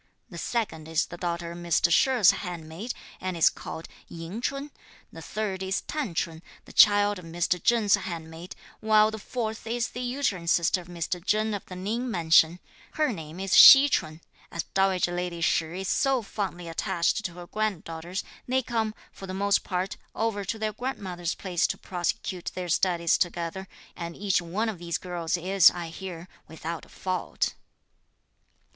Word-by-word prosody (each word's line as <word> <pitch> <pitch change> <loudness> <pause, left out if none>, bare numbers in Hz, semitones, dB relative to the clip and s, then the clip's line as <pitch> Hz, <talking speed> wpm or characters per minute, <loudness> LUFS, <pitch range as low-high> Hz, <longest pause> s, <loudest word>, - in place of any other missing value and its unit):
The - - -7
second 200 -10 -2
is 160 -1 +1
the 175 - -9
daughter 170 -1 -3
of 170 - -8
Mr. 170 0 +2
She's 245 0 +5
handmaid, 175 +4 -6 0.3
and 185 -2 -3
is 165 - +5
called 160 - -8 0.2
Ying 170 +7 -7
Ch'un; 280 +3 -3 0.4
the 165 - -9
third 195 +2 -3
is 190 0 -1
T'an 275 - -3
Ch'un, 160 0 -2 0.2
the - - -14
child 205 -1 +6
of 180 - -12
Mr. 175 +1 -1
Cheng's 225 -4 +3
handmaid; 170 -3 -3 0.2
while 215 0 +4
the 220 - -6
fourth 220 0 -4
is 240 +1 -1
the 250 - -6
uterine 245 -9 -1
sister 170 +1 +3
of 175 - -15
Mr. 175 0 -4
Chen 215 +2 +1
of 200 - -4
the 185 - -8
Ning 220 +7 -2
Mansion. 165 -2 +4 0.3
Her 305 -5 +1
name 160 -1 -8
is 195 0 -2
Hsi 280 +1 +11
Ch'un. 155 - -1 0.3
As 170 - -3
dowager 190 -2 +2
lady 175 -1 -3
Shih 165 +2 0
is 190 - -4
so 265 +3 +2
fondly 190 -4 -4
attached 170 +5 0
to 175 - -4
her 175 0 -9
granddaughters, 180 -3 -3 0.2
they 260 +1 +1
come, 225 -2 -1 0.2
for 195 - -10
the 185 - -5
most 200 +1 +2
part, 185 0 -2 0.2
over 220 -2 -1
to 210 +3 -3
their 215 -1 -2
grandmother's 185 -9 -4
place 180 -3 0
to - - -3
prosecute 180 0 -3
their 180 -1 -4
studies 170 -1 +2
together, 175 +1 -2 0.3
and 170 -1 -6
each 195 -2 +1
one 190 +7 -2
of 210 -6 -4
these 170 -1 -2
girls 175 -2 -2
is, 185 +1 +6
I 175 -2 -6
hear, 175 0 -8 0.2
without 160 +1 -6
a - - -21
fault." 185 -2 -2
185 Hz, 175 wpm, -27 LUFS, 170-215 Hz, 0.4 s, Hsi